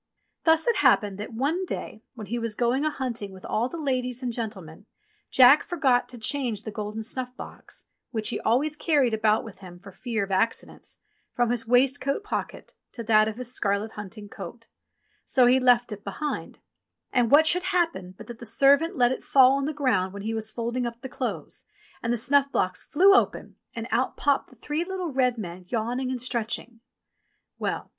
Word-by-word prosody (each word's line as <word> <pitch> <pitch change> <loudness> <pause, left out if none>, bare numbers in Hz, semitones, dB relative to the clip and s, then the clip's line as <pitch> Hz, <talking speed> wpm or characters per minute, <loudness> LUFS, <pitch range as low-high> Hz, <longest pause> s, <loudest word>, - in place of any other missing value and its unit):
Thus 320 -1 +4
it 470 - +3
happened 200 -2 +3
that 210 - -6
one 285 +11 -1
day 220 -10 -6
when 220 -3 -7
he 240 +4 -3
was 230 -2 -3
going 245 +5 +1
a - - +3
hunt 255 -6 -4
ing 200 -1 -6
with 190 -1 -12
all 235 +4 -1
the 340 - -7
ladies 255 -4 -2
and 245 -2 -2
gentlemen, 205 -6 -6 0.4
Jack 260 +3 +7
forgot 260 -8 +1
to 250 - -8
change 235 -3 -1
the 215 - -6
golden 210 +1 -5
snufi^ 250 +3 -5
box - - -11 0.2
(which 220 -2 -2
he - - -3
always 285 +7 +1
carried 290 -7 +2
about 215 0 +2
with 220 -4 -11
him 180 -2 -11
for 195 +2 -13
fear 225 +1 -3
of 195 - -6
accidents) 195 +5 -2 0.4
from 240 -1 +2
his 235 -2 -2
waistcoat 275 - +2
pocket 420 - -5 0.2
to 235 - -6
that 215 -1 +4
of 220 0 -4
his 250 0 -5
scarlet 200 +1 -1
hunting 210 0 -9
coat; 200 +4 -10 0.5
so 255 -3 +3
he 250 +2 +5
left 245 -2 +3
it 205 -1 -7
behind 290 +10 -4
him. - - -35 0.5
And 245 -3 +3
what 295 +4 +6
should 360 +3 +2
happen 330 - -1
but - - -10
that 240 -2 -10
the - - -10
servant 280 - +4
let 245 -1 +4
it 260 - -4
fall 260 -2 +6
on 275 0 0
the 305 - -1
ground 250 -11 0
when 200 0 -7
he 220 +1 -2
was 220 -1 -2
folding 235 +2 -2
up 235 0 -8
the 265 - -7
clothes, - - -5 0.4
and 230 - -1
the 240 - +1
snuff 275 +4 +3
box 185 0 0
flew 385 +6 +5
open - - +1 0.2
and 230 0 -5
out 255 +2 0
popped 285 -1 +1
the 255 - -18
three 295 +7 -3
little 365 -2 -4
red 250 -2 +2
men 180 -3 -7
yawn 235 +4 -2
ing 260 -1 -2
and 255 -1 -3
stretching. 235 -1 -3 0.8
Well - - -3
240 Hz, 205 wpm, -26 LUFS, 215-275 Hz, 0.8 s, Jack